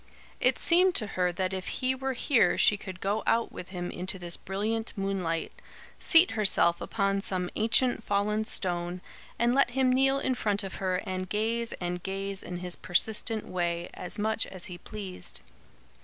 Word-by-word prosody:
It - - +3
seemed 360 +2 +4
to 215 - 0
her 180 -1 +1
that 185 +2 -2
if 185 -1 -4
he 255 0 0
were 265 0 -3
here 250 -1 +3
she 210 - +5
could 190 -2 -9
go 205 +3 0
out 230 0 +2
with 180 - -8
him 180 -2 -5
into 185 +2 -4
this 175 -1 -3
brilliant 220 +4 -3
moonlight, 190 -5 -2 0.5
seat 335 +2 +6
herself 195 -5 +3
upon 195 -2 0
some 185 -3 -2
ancient 230 +2 +2
fallen 210 +2 0
stone, 175 -2 -1 0.4
and 235 +1 +2
let 275 -1 +4
him 255 0 +2
kneel 270 +1 +3
in 260 -1 0
front 205 -4 0
of 195 - -6
her 185 -1 0
and 185 -1 -4
gaze 230 +2 0
and 180 0 -4
gaze 195 +1 -4
in 180 - -5
his 180 0 -2
persistent 220 +4 +1
way, 175 -1 -2
as 180 +4 0
much 220 +1 0
as 185 -2 -8
he 175 -1 -8
pleased. 90 - -7
195 Hz, 175 wpm, -28 LUFS, 180-225 Hz, 0.5 s, seat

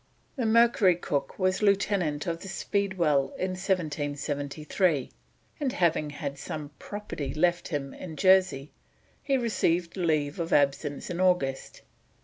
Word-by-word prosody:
The 250 -5 -1
Mercury 220 -5 +5
Cook 140 -5 -3
was 185 0 +1
lieutenant 195 -7 +1
of 165 -1 -3
the - - -8
Speedwell 175 -8 0
in 185 0 -1
1773, 150 -3 -1 0.5
and 275 -4 -1
having 160 -4 +1
had 145 -2 -5
some 150 0 -6
property 155 -10 -5
left 175 +2 +1
him 140 -4 -4
in 165 -4 -8
Jersey 185 -6 +3 0.5
he 275 -1 +1
received 180 -8 0
leave 155 -5 0
of 165 -1 -3
absence 145 +2 +1
in 175 - -4
August. 180 -8 0
170 Hz, 130 wpm, -28 LUFS, 145-190 Hz, 0.5 s, Mercury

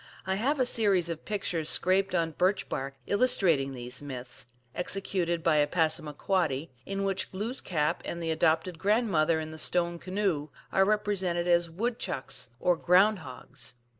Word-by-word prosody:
I 190 - 0
have 265 +9 0
a 255 - +3
series 200 -8 +3
of 165 -1 -5
pictures 175 -6 -2
scraped 190 +1 +1
on 165 -1 +1
birch 185 +5 +1
bark 135 +1 -4
illustrating 185 - +2
these 125 +1 -6
myths, 125 -4 -8 0.3
executed 180 -2 -1
by 155 -1 +3
a 145 0 +4
Passamaquoddy, 155 -1 0 0.2
in 195 0 -2
which 195 -1 -2
Glooskap 190 - -1
and 170 - -5
the 165 -1 -2
adopted 160 +2 +1
grandmother 175 -6 +2
in 155 0 -5
the 160 - -8
stone 170 +1 0
canoe 185 -6 -1 0.2
are 195 - +4
represented 195 -4 0
as 175 -1 +3
wood 225 +8 -2
chucks, 125 -2 -2
or 180 - +3
ground 190 +5 +4
hogs. 125 -3 -10
175 Hz, 155 wpm, -29 LUFS, 155-195 Hz, 0.3 s, a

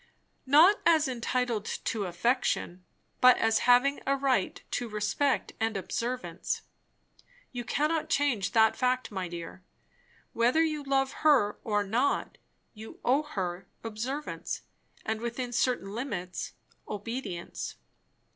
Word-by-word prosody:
"Not 325 +9 +7
as 320 -3 +4
entitled 245 -2 -1
to 215 -3 -2
affection, 180 -1 0 0.4
but 250 0 +7
as 225 0 +3
having 250 +3 +5
a 275 - +3
right 265 -7 0
to 240 -2 -2
respect 215 +6 0
and 225 -2 0
observance. 200 -3 -3 0.9
You 245 -2 -4
cannot 305 +6 0
change 250 -10 +1
that 220 -1 +5
fact, 255 -1 0
my 190 -3 -3
dear. 170 +1 -8 0.7
Whether 245 +8 +3
you 305 -2 -1
love 270 -1 +1
her 270 -9 +4
or 210 -2 +1
not, 240 +8 0 0.3
you 220 0 -11
owe 265 +4 +4
her 185 -11 -4 0.2
observance; 240 +7 -4 0.4
and 220 0 -2
within 240 +1 -3
certain 240 -5 0
limits, 205 -7 -4 0.3
obedience. 210 -4 -5
240 Hz, 120 wpm, -29 LUFS, 205-270 Hz, 0.9 s, Not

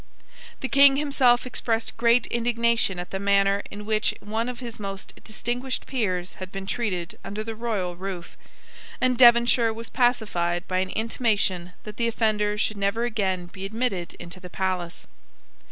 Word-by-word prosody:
The 265 - -1
King 275 0 +7
himself 270 -4 +3
expressed 225 -2 -2
great 235 +1 +4
indignation 235 -4 +1
at 175 0 -6
the 190 - -3
manner 200 0 +3
in 205 +1 -8
which 215 0 +1
one 225 +3 -2
of 245 -1 -6
his 235 -3 -8
most 195 -1 -6
distinguished 245 +4 -3
peers 185 -8 -2
had 185 0 -6
been 195 0 -6
treated 190 -5 -3
under 210 +2 -4
the 225 0 -5
royal 215 -6 -2
roof; 185 -1 -6 0.6
and 255 0 +2
Devonshire 235 -1 +6
was 225 +1 -7
pacified 205 -9 +1
by 185 0 0
an 185 0 -1
intimation 205 -5 0
that 210 -1 -9
the 235 - +1
offender 215 -2 +1
should 215 0 0
never 200 +4 0
again 195 -6 -1
be 190 +2 -10
admitted 200 -4 -2
into 175 +2 -9
the 180 0 -10
palace. 180 -2 -3
215 Hz, 160 wpm, -25 LUFS, 190-235 Hz, 0.6 s, King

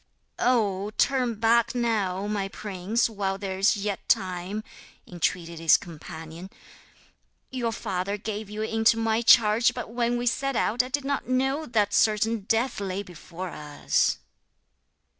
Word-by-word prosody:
'Oh! 210 -5 +1
turn 255 -4 +2
back 230 +3 +2
now, 205 -6 0
my 205 -2 -2
prince, 200 +3 -1
while 200 -3 -2
there 190 -1 -5
is 200 +2 +4
yet 200 -1 -4
time,' 185 +3 0 0.4
entreated 170 -1 -2
his 165 -1 +6
companion. 165 +1 -10 1.0
'Your 245 -3 -1
father 200 -2 -3
gave 210 0 -5
you 210 +1 -4
into 225 +1 +2
my 225 0 +1
charge; 230 0 +5
but 245 -3 -6
when 240 0 0
we 240 - -3
set 275 +2 0
out 230 +2 +2
I 250 - -6
did 275 +1 -2
not 280 -2 -2
know 270 +4 0
that 210 -3 +1
certain 215 -1 +2
death 230 +2 +1
lay 195 0 -3
before 180 0 -8
us.' 150 -2 0
210 Hz, 140 wpm, -26 LUFS, 190-235 Hz, 1.0 s, his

